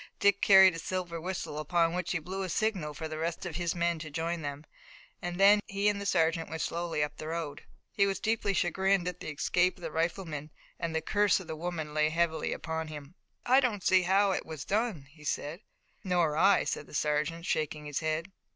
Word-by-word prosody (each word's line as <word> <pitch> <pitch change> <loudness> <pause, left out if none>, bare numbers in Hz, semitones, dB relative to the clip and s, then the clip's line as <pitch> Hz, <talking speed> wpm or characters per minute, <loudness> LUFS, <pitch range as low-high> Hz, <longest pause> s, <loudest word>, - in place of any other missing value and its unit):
Dick 200 0 +3
carried 190 -2 +8
a 165 - -5
silver 175 -1 -3
whistle, 175 -4 -4
upon 165 +2 +1
which 180 -1 -2
he 180 - +1
blew 185 +4 -5
a 190 - -3
signal 185 -7 -1
for 160 - -4
the 155 0 -6
rest 170 +3 -3
of 165 -3 -4
his 175 -1 -1
men 170 -1 0
to 155 0 -7
join 165 +3 -2
them, 145 0 -5 0.6
and 175 +1 -4
then 200 +1 +7
he 200 +1 0
and 200 -1 -2
the 200 - -3
sergeant 165 -2 +1
went 160 0 -3
slowly 170 -3 -1
up 150 0 -4
the 155 - -6
road. 160 -2 -4 0.3
He 200 -1 +3
was 195 - -1
deeply 215 -3 0
chagrined 190 +1 +2
at 180 -1 -4
the - - -6
escape 175 +5 +1
of 180 - -15
the 165 - -4
rifleman, 160 -2 -2 0.3
and 165 -1 -3
the 160 - +1
curse 205 +3 +3
of 190 - -9
the 160 -1 -5
woman 160 -2 -4
lay 155 0 +3
heavily 160 -1 0
upon 160 0 -3
him. 150 0 -9 0.3
"I 260 +2 +6
don't 225 -8 0
see 185 0 +5
how 195 +2 +3
it - - -1
was 155 -4 -7
done," 210 - -1
he 150 0 -17
said. 150 +3 -3 0.4
"Nor 175 -5 +1
I," 195 +4 +5
said 145 - -3
the - - -10
sergeant, 150 +3 0
shaking 155 -4 -1
his 145 -2 -2
head. 160 +3 -2
170 Hz, 220 wpm, -30 LUFS, 155-190 Hz, 0.6 s, carried